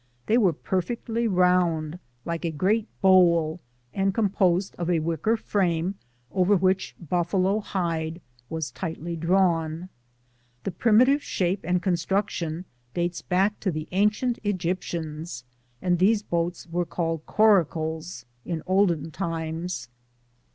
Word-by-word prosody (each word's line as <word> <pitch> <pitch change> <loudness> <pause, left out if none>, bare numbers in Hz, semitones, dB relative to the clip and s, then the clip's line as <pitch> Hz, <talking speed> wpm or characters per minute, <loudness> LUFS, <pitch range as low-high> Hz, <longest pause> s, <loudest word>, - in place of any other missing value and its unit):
They 230 +3 +3
were 195 -6 +4
perfectly 225 - -2
round, 180 -4 +2 0.3
like 170 0 -3
a 170 - 0
great 200 +8 +1
bowl, 175 -4 +4 0.3
and 195 0 0
composed 190 -3 +1
of 175 0 -2
a 175 - +3
wicker 165 +8 0
frame 180 -4 0 0.4
over 190 +2 +3
which 185 +1 +1
buffalo 185 +4 +1
hide 165 -5 -2 0.3
was 160 -6 -3
tightly 165 +4 -5
drawn. 165 -1 +1 0.7
The 195 - -2
primitive 240 - +4
shape 185 -4 -1
and 180 +1 0
construction 175 -2 -1 0.3
dates 175 0 -1
back 195 +3 +1
to 200 - -1
the 155 -2 -4
ancient 210 +6 +1
Egyptians, 170 - -3 0.4
and 175 -1 +2
these 205 +3 +3
boats 170 -1 -2
were 175 +1 -1
called 165 -2 -2
coracles 165 - +2 0.2
in 165 -3 -4
olden 175 -5 +2
times. 165 -4 -3
180 Hz, 120 wpm, -26 LUFS, 165-195 Hz, 0.7 s, were